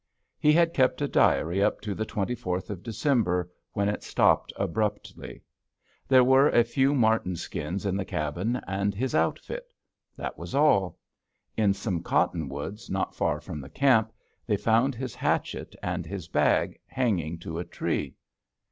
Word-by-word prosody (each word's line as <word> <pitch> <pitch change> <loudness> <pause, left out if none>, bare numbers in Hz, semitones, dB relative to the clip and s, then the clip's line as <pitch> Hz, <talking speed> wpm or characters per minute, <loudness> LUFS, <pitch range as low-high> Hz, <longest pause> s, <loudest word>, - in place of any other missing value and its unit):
He 150 - +5
had 165 +1 +4
kept 130 -2 +2
a - - +1
diary 90 - +2
up - - +2
to 105 -2 -3
the 110 +2 -3
24th 105 -3 -3
of 95 -4 -6
December, 105 - 0 0.2
when 100 0 0
it 105 - -1
stopped - - +2
abruptly. 105 +2 -3 0.6
There 130 -1 +6
were 130 +3 +5
a 120 - +5
few 135 +4 +1
marten 110 -7 +2
skins 85 +4 -4
in 95 -1 0
the 95 - -1
cabin, 85 +8 -2
and 100 +1 -1
his 130 +5 -2
outfit. - - -1 0.5
That - - -5
was - - -6
all. 100 -11 +3 0.6
In 100 -3 +2
some 95 -4 -2
cottonwoods, 80 +5 -2
not 95 0 -2
far - - 0
from 75 - -7
the 70 - -10
camp, 115 - +3 0.4
they 105 -3 +2
found 115 +6 +2
his 130 -1 -5
hatchet - - -2
and - - -2
his 95 -4 -6
bag - - +1
hanging 90 - -1
to 80 0 -6
a - - -2
tree. - - -3
105 Hz, 155 wpm, -27 LUFS, 90-125 Hz, 0.6 s, There